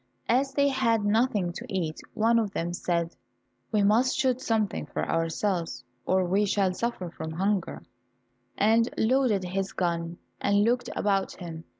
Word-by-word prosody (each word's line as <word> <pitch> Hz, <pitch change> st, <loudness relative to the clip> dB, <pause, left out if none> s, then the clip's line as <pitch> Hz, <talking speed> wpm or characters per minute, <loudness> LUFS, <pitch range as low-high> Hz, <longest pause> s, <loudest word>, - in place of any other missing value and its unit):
As 270 Hz, +3 st, +2 dB
they 280 Hz, 0 st, +4 dB
had 230 Hz, -5 st, +1 dB
nothing 205 Hz, -4 st, +1 dB
to -, -, -7 dB
eat, 170 Hz, -5 st, -2 dB, 0.2 s
one 230 Hz, +2 st, +3 dB
of 210 Hz, -3 st, -2 dB
them 175 Hz, -3 st, -2 dB
said, 170 Hz, -1 st, -1 dB, 0.6 s
"We 210 Hz, -2 st, +2 dB
must 230 Hz, +7 st, +3 dB
shoot 260 Hz, -3 st, +1 dB
something 220 Hz, -4 st, -1 dB
for -, -, -3 dB
ourselves 165 Hz, -4 st, -1 dB, 0.2 s
or 185 Hz, 0 st, +3 dB
we 195 Hz, +4 st, +2 dB
shall 195 Hz, -2 st, +1 dB
suffer 185 Hz, -4 st, -3 dB
from 160 Hz, -1 st, -6 dB
hunger," 195 Hz, +2 st, -1 dB, 0.7 s
and 225 Hz, +3 st, +3 dB
loaded 230 Hz, -4 st, +2 dB
his 190 Hz, +2 st, -3 dB
gun, 170 Hz, -1 st, -2 dB, 0.2 s
and 200 Hz, 0 st, +3 dB
looked 245 Hz, +2 st, +1 dB
about 195 Hz, -2 st, 0 dB
him. 165 Hz, -3 st, -8 dB
200 Hz, 155 wpm, -27 LUFS, 175-230 Hz, 0.7 s, they